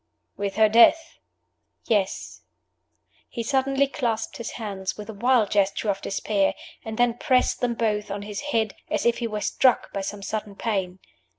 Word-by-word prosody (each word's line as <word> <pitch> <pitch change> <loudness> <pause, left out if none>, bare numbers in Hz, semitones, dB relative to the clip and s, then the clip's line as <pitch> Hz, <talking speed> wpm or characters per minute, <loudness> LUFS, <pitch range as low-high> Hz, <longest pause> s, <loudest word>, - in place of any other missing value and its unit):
"With 200 -1 -3
her 220 0 +5
death?" 235 +9 +5 0.7
"Yes." 205 -4 -1 0.9
He 235 - -4
suddenly 270 +2 +2
clasped 235 -5 -2
his 235 - -6
hands 195 -4 -4
with 210 +1 -7
a - - -11
wild 235 0 +2
gesture 200 +1 +1
of 195 0 -5
despair, 195 0 0 0.3
and 220 -1 -6
then 240 -1 +2
pressed 255 -4 +2
them 240 -1 0
both 210 -2 -1
on 200 +1 -4
his 205 -1 -5
head, 220 -6 +1 0.2
as - - -1
if 235 0 +2
he 235 - -1
were 210 -1 -4
struck 255 +3 +2
by 195 - -2
some 200 +1 -5
sudden 210 -1 -4
pain. 195 -5 -2
220 Hz, 170 wpm, -25 LUFS, 200-235 Hz, 0.9 s, her